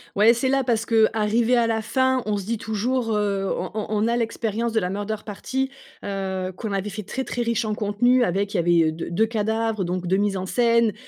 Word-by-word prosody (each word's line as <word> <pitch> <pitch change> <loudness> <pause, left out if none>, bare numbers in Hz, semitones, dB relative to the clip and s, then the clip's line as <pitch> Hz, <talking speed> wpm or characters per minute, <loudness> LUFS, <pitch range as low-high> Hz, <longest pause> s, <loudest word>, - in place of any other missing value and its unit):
Ouais, 215 +4 +6
c'est 260 +3 0
là 270 0 +2
parce 230 -2 0
qu'arrivé 225 +1 +2
à 235 -1 +3
la 225 -1 0
fin, 260 +2 +1
on 210 -1 0
se 195 - -5
dit 230 +2 -1
toujours, 225 +2 -1
heu, 200 -2 0
on - - -3 0.2
on 215 +1 +1
a 235 +1 +1
l'expérience 230 0 -1
de 225 - +3
la 180 -3 -2
murder 205 +3 -3
party, 265 +6 -3 0.3
heu, 190 -2 -3
qu'on 215 +2 -5
avait 195 +1 -2
fait 210 +1 -6
très, 250 +7 -4
très 245 - -3
riche 235 -1 0
en 215 -1 -1
contenu 245 +4 +2
avec 200 0 -1
il - - 0
y - - +2
avait 170 -2 +3
d 160 +1 -6
2 215 +6 +3
cadavres, 220 -1 -1
donc 180 0 -3
2 190 +2 +2
mises 200 -1 0
en 185 - -3
scène, 230 +1 +3
220 Hz, 230 wpm, -23 LUFS, 200-235 Hz, 0.3 s, Ouais